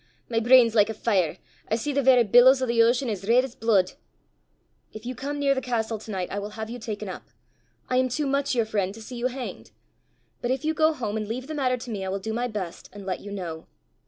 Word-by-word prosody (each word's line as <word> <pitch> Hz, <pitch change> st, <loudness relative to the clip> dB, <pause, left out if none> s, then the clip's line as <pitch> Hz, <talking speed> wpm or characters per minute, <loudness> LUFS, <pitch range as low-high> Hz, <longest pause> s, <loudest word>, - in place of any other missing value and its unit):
My 230 Hz, -1 st, +1 dB
brain 245 Hz, +1 st, +7 dB
's 225 Hz, -, -5 dB
like 210 Hz, -1 st, +4 dB
a 220 Hz, -, -4 dB
fire: 190 Hz, -7 st, +1 dB, 0.3 s
I 220 Hz, -, +2 dB
see 285 Hz, +6 st, -2 dB
the 280 Hz, -, +2 dB
verra 255 Hz, -2 st, +6 dB
billows 245 Hz, +5 st, +6 dB
o' 260 Hz, -, 0 dB
the 235 Hz, -1 st, +3 dB
ocean 245 Hz, +3 st, +3 dB
as 205 Hz, -4 st, -3 dB
reid 245 Hz, +3 st, +5 dB
's 265 Hz, -3 st, -6 dB
blude." 205 Hz, -5 st, +2 dB, 1.0 s
"If 215 Hz, +1 st, -10 dB
you 250 Hz, -, -3 dB
come 280 Hz, +4 st, -4 dB
near 280 Hz, -1 st, +3 dB
the 265 Hz, -, -2 dB
castle 230 Hz, -3 st, -2 dB
to 220 Hz, -, -12 dB
night, 190 Hz, -3 st, -3 dB
I 205 Hz, -, -2 dB
will 205 Hz, +1 st, -5 dB
have 220 Hz, +1 st, -5 dB
you 245 Hz, -, -6 dB
taken 215 Hz, -2 st, -5 dB
up. 185 Hz, -, -8 dB, 0.6 s
I 255 Hz, -, +1 dB
am 255 Hz, 0 st, +2 dB
too 295 Hz, +4 st, -1 dB
much 275 Hz, 0 st, 0 dB
your 230 Hz, -2 st, +2 dB
friend 205 Hz, -3 st, -1 dB
to 225 Hz, -, -11 dB
see 250 Hz, +2 st, -8 dB
you 240 Hz, +1 st, 0 dB
hanged! 255 Hz, 0 st, -7 dB, 0.7 s
But 240 Hz, -, -2 dB
if 265 Hz, +3 st, -1 dB
you 315 Hz, -, +1 dB
go 315 Hz, 0 st, +3 dB
home 220 Hz, -6 st, -3 dB
and 215 Hz, -1 st, -3 dB
leave 250 Hz, +4 st, -4 dB
the 310 Hz, -, -6 dB
matter 260 Hz, -4 st, +1 dB
to 245 Hz, 0 st, -8 dB
me, 200 Hz, -3 st, -3 dB
I 190 Hz, -, -3 dB
will 195 Hz, -, -1 dB
do 220 Hz, +3 st, -4 dB
my 240 Hz, +2 st, -1 dB
best, 195 Hz, -7 st, -6 dB
and 200 Hz, 0 st, -10 dB
let 185 Hz, -2 st, -2 dB
you 205 Hz, -, -9 dB
know. 170 Hz, -5 st, -6 dB
230 Hz, 265 wpm, -25 LUFS, 210-255 Hz, 1.0 s, brain